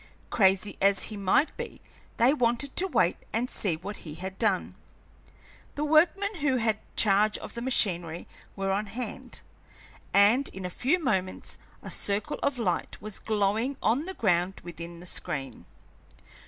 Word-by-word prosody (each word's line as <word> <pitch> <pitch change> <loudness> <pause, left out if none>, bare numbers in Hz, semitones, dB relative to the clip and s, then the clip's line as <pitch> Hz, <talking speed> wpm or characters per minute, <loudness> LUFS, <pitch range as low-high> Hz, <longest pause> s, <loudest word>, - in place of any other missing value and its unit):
Crazy 195 -1 +3
as 195 0 +4
he - - -5
might 200 +9 +2
be, - - -6 0.4
they 245 +4 +5
wanted 250 0 +1
to 380 - +3
wait 185 - +2
and 235 +3 -1
see 185 -6 0
what 195 +5 -7
he 150 -2 -9
had 190 +3 -7
done. 205 -5 +1 1.0
The 290 - -2
workmen 350 +7 +3
who 280 -4 +1
had 220 -2 +1 0.2
charge 210 0 +4
of - - -8
the 235 - -5
machinery 175 -9 0 0.3
were 195 0 -1
on 205 +2 -1
hand, 245 +4 -6 0.7
and 215 +7 +5
in 190 -1 -7
a 180 - -4
few 275 - +2
moments 190 - -2 0.2
a - - -7
circle 200 +1 -2
of 280 -2 0
light 190 -8 -2
was 215 -1 -6
glowing 220 +5 0
on 250 +8 +2
the 380 +1 -5
ground 180 -2 +1
within 170 0 -8
the - - -11
screen. 135 -8 -4
210 Hz, 155 wpm, -28 LUFS, 185-250 Hz, 1.0 s, they